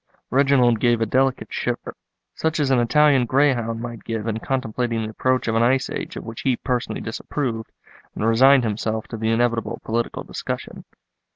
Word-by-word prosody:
Reginald 130 Hz, -3 st, +4 dB
gave 120 Hz, 0 st, +3 dB
a 115 Hz, -, +1 dB
delicate 130 Hz, +4 st, 0 dB
shiver, -, -, -3 dB, 0.4 s
such 160 Hz, 0 st, -1 dB
as 140 Hz, -2 st, +1 dB
an 130 Hz, -, +4 dB
Italian 135 Hz, +1 st, +4 dB
greyhound 120 Hz, -4 st, +1 dB
might 120 Hz, -2 st, -7 dB
give 110 Hz, -2 st, -4 dB
in 110 Hz, -1 st, -2 dB
contemplating 120 Hz, -3 st, -2 dB
the 110 Hz, -, -4 dB
approach 130 Hz, +3 st, 0 dB
of 110 Hz, -, +1 dB
an 115 Hz, -, +2 dB
ice 125 Hz, +2 st, +2 dB
age -, -, -5 dB
of -, -, -6 dB
which 115 Hz, 0 st, -7 dB
he 130 Hz, -2 st, +1 dB
personally 125 Hz, -3 st, -2 dB
disapproved, 115 Hz, 0 st, -4 dB, 0.4 s
and -, -, -2 dB
resigned 130 Hz, +4 st, +5 dB
himself 110 Hz, 0 st, -2 dB
to 115 Hz, -, -5 dB
the 110 Hz, 0 st, -1 dB
inevitable 115 Hz, 0 st, 0 dB
political 115 Hz, +1 st, -2 dB
discussion. -, -, -6 dB
120 Hz, 175 wpm, -22 LUFS, 115-130 Hz, 0.4 s, resigned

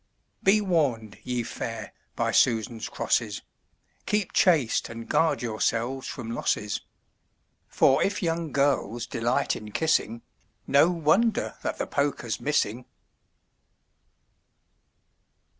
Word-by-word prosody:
Be 210 Hz, +2 st, +4 dB
warn'd, 140 Hz, -, 0 dB
ye 125 Hz, -1 st, -2 dB
fair, 115 Hz, -2 st, -6 dB, 0.2 s
by -, -, 0 dB
Susans 115 Hz, 0 st, +1 dB
crosses: -, -, -1 dB, 0.6 s
Keep 210 Hz, -3 st, 0 dB
chaste 155 Hz, -11 st, +3 dB
and 115 Hz, 0 st, -8 dB
guard 160 Hz, -5 st, +1 dB
yourselves 120 Hz, +3 st, -1 dB
from 115 Hz, -3 st, -6 dB
losses; 105 Hz, -3 st, -1 dB, 0.9 s
For 135 Hz, -, +3 dB
if 205 Hz, 0 st, 0 dB
young 165 Hz, -2 st, -1 dB
girls 130 Hz, -4 st, 0 dB
delight 120 Hz, +5 st, 0 dB
in 105 Hz, -1 st, -8 dB
kissing, 115 Hz, -6 st, 0 dB, 0.4 s
No 145 Hz, +4 st, +5 dB
wonder 180 Hz, +7 st, +1 dB
that -, -, -3 dB
the -, -, -2 dB
poker's 140 Hz, -5 st, -1 dB
missing. 125 Hz, -5 st, 0 dB
130 Hz, 105 wpm, -26 LUFS, 115-160 Hz, 0.9 s, No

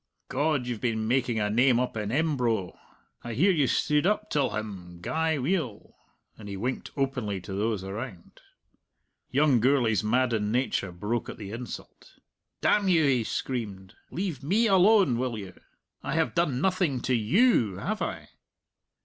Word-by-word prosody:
God, 145 Hz, -1 st, 0 dB
you've 120 Hz, -3 st, -4 dB
been 110 Hz, -3 st, -1 dB
making 125 Hz, -2 st, +1 dB
a 105 Hz, -, +1 dB
name 120 Hz, +2 st, +4 dB
up 125 Hz, -1 st, -2 dB
in 105 Hz, -1 st, -3 dB
Embro. 125 Hz, -, 0 dB, 0.5 s
I 120 Hz, -1 st, -5 dB
hear 185 Hz, -, +4 dB
you 150 Hz, -7 st, +2 dB
stood 150 Hz, +6 st, +2 dB
up 210 Hz, +1 st, 0 dB
till 140 Hz, -3 st, +2 dB
him 95 Hz, -5 st, -6 dB
gey 160 Hz, -, 0 dB
weel," 135 Hz, -, -2 dB, 0.4 s
and 105 Hz, -2 st, -9 dB
he 100 Hz, -, -5 dB
winked 125 Hz, +6 st, -3 dB
openly 125 Hz, -8 st, -1 dB
to 95 Hz, -, -8 dB
those 105 Hz, 0 st, -1 dB
around. 100 Hz, -2 st, -8 dB, 0.9 s
Young 140 Hz, -1 st, +3 dB
Gourlay's 115 Hz, -5 st, +2 dB
maddened 110 Hz, -2 st, +1 dB
nature 120 Hz, -6 st, 0 dB
broke 105 Hz, +7 st, -3 dB
at -, -, -7 dB
the 100 Hz, -2 st, -7 dB
insult. 120 Hz, +2 st, -9 dB, 0.5 s
"Damn 205 Hz, -2 st, +3 dB
you," 170 Hz, -4 st, +4 dB
he 130 Hz, -5 st, +3 dB
screamed, 100 Hz, -6 st, -4 dB, 0.2 s
"leave 175 Hz, -7 st, -3 dB
me 200 Hz, +12 st, +2 dB
alone, 195 Hz, -, +5 dB
will 125 Hz, -3 st, -2 dB
you? 95 Hz, -3 st, -8 dB, 0.5 s
I -, -, -3 dB
have 160 Hz, -1 st, +1 dB
done 150 Hz, -7 st, +1 dB
nothing 180 Hz, -8 st, +1 dB
to 130 Hz, -, 0 dB
you, 120 Hz, -, +3 dB
have 215 Hz, -, -3 dB
I?" -, -, -4 dB
125 Hz, 160 wpm, -27 LUFS, 110-150 Hz, 0.9 s, alone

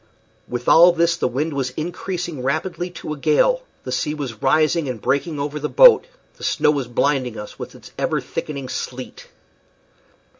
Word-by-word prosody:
With 120 Hz, 0 st, -5 dB
all 175 Hz, +2 st, +8 dB
this 170 Hz, 0 st, +2 dB
the 170 Hz, -, 0 dB
wind 145 Hz, +6 st, -2 dB
was 135 Hz, -2 st, -1 dB
increasing 175 Hz, -2 st, -4 dB
rapidly 170 Hz, +7 st, -2 dB
to 170 Hz, -3 st, -6 dB
a -, -, -8 dB
gale, 155 Hz, -, +2 dB, 0.2 s
the 130 Hz, -, -6 dB
sea 140 Hz, +4 st, -1 dB
was 130 Hz, -7 st, -6 dB
rising 155 Hz, +2 st, +2 dB
and 125 Hz, -3 st, -4 dB
breaking 145 Hz, +6 st, -1 dB
over 145 Hz, +1 st, -3 dB
the 150 Hz, -, -3 dB
boat, -, -, +7 dB, 0.3 s
the -, -, -13 dB
snow 150 Hz, -, +2 dB
was 140 Hz, -5 st, -2 dB
blinding 125 Hz, -1 st, 0 dB
us 105 Hz, -, -9 dB
with -, -, -8 dB
its -, -, -14 dB
ever -, -, 0 dB
thickening 140 Hz, -3 st, -5 dB
sleet. 125 Hz, 0 st, -6 dB
150 Hz, 175 wpm, -21 LUFS, 130-170 Hz, 0.3 s, all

